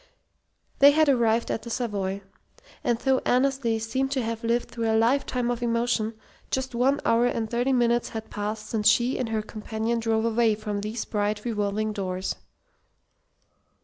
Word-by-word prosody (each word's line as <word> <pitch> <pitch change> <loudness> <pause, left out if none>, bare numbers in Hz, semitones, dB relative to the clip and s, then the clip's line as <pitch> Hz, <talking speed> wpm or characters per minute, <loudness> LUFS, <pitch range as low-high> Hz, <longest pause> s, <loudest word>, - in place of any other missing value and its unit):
They 280 - +9
had 310 -1 +4
arrived 235 -3 +2
at - - -2
the 235 - -8
Savoy: 200 -5 -2 0.6
and 235 - +1
though 265 +1 +2
Annesley 255 -3 +1
seemed 260 +5 -1
to 260 -3 0
have 225 0 -4
lived 235 +1 0
through 230 -1 -2
a 220 - +3
lifetime 245 +1 +1
of 240 0 -3
emotion, 230 -1 0 0.3
just 260 -1 -2
one 265 +4 +2
hour 235 +1 +4
and 230 -2 -1
thirty 245 +4 0
minutes 240 -2 +2
had 220 -1 -7
passed 210 +1 -4
since 215 -1 0
she 240 +4 +3
and 250 -3 -2
her 220 -1 -1
companion 220 +2 -3
drove 225 0 0
away 230 -1 +2
from 210 -1 -4
these 215 +2 -4
bright 210 0 -2
revolving 215 -1 -1
doors. 185 -2 -3
230 Hz, 165 wpm, -26 LUFS, 215-245 Hz, 0.6 s, They